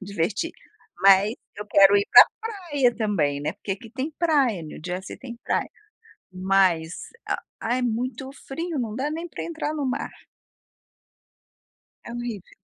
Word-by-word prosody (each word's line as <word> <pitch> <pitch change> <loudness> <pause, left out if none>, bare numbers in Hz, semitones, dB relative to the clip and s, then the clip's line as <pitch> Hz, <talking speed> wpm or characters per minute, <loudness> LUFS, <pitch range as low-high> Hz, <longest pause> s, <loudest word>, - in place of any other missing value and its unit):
divertir, 200 - -2 0.5
mas 195 +3 +6 0.2
eu 210 - -6
quero 200 0 +6
ir 200 0 +2
pra - - +11 0.2
praia 345 - 0
também, 160 -11 0
né. 145 - -2
Porque 200 - -4
aqui 220 +4 -9
tem 265 +5 -3
praia, 280 - +2
New 155 - -9
Jersey 180 +1 -5
tem 240 -3 -9
praia, - - 0 0.6
mas, 185 -3 +1 0.5
ah, 240 +2 0
é 255 - -1
muito 250 +3 -2
frio, 325 +3 -5
não 225 -3 -3
dá 275 +4 -1
nem 330 +2 -4
para - - -6
entrar 315 -2 -3
no 295 -2 -2
mar. 255 - -2 1.9
É - - -9
horrível. 235 -5 -6
230 Hz, 145 wpm, -24 LUFS, 195-275 Hz, 1.9 s, pra